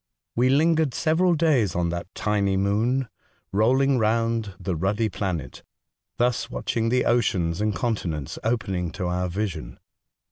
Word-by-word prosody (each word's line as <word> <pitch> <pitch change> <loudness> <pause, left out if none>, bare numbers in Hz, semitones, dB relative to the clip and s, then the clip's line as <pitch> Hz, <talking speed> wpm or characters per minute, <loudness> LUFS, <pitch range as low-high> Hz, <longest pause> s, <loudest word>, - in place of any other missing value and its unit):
We 125 +2 +3
lingered 155 0 +3
several 170 +2 +2
days 145 - +2
on 85 -1 +1
that 85 +2 -4
tiny 100 -2 +1
moon, 115 +7 +1 0.4
rolling 130 +6 +3
round 115 -2 0
the 95 -3 -2
ruddy 100 +6 0
planet, 90 -10 -4 0.6
thus 120 -1 +1
watching 115 -2 -1
the 125 +1 +2
oceans 95 -7 +1
and 105 -2 0
continents 90 - -2
opening 100 -7 -1
to 90 - -4
our 90 +1 -1
vision. 90 -3 -4
110 Hz, 135 wpm, -25 LUFS, 95-125 Hz, 0.6 s, We